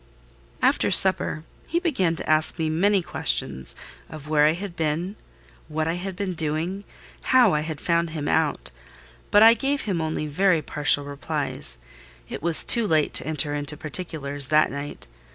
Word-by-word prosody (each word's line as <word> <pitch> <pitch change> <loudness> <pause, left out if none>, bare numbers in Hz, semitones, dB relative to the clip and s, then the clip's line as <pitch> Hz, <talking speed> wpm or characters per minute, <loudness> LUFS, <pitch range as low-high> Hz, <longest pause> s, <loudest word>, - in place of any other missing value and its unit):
After - - +2
supper, 185 -4 +5 0.2
he 335 - -2
began 195 - -1
to - - -7
ask 155 +2 +2
me 160 -2 -2
many 195 +4 +1
questions, 65 - -1 0.3
of 150 -2 -11
where 150 -1 +3
I 155 - +2
had 180 +1 -8
been, 165 +5 -3 0.5
what 155 +1 -3
I 165 - -1
had 185 +2 -6
been 190 -1 -4
doing, 165 +5 -3 0.4
how 250 -6 +4
I 150 - +1
had 155 -1 -6
found 170 -1 -1
him 155 -2 -5
out; 150 - -1 0.6
but 205 - +5
I 225 +1 +8
gave 275 +3 -2
him 185 -6 -3
only 155 -1 -3
very 165 +2 +1
partial 145 -1 0
replies: 140 - -3 0.5
it - - -7
was 165 0 +4
too 235 -3 +5
late 155 -4 +1
to - - +4
enter 150 -1 0
into 145 0 -3
particulars 145 -3 -3
that 155 +1 +2
night. 140 +1 -8
160 Hz, 170 wpm, -23 LUFS, 150-185 Hz, 0.6 s, I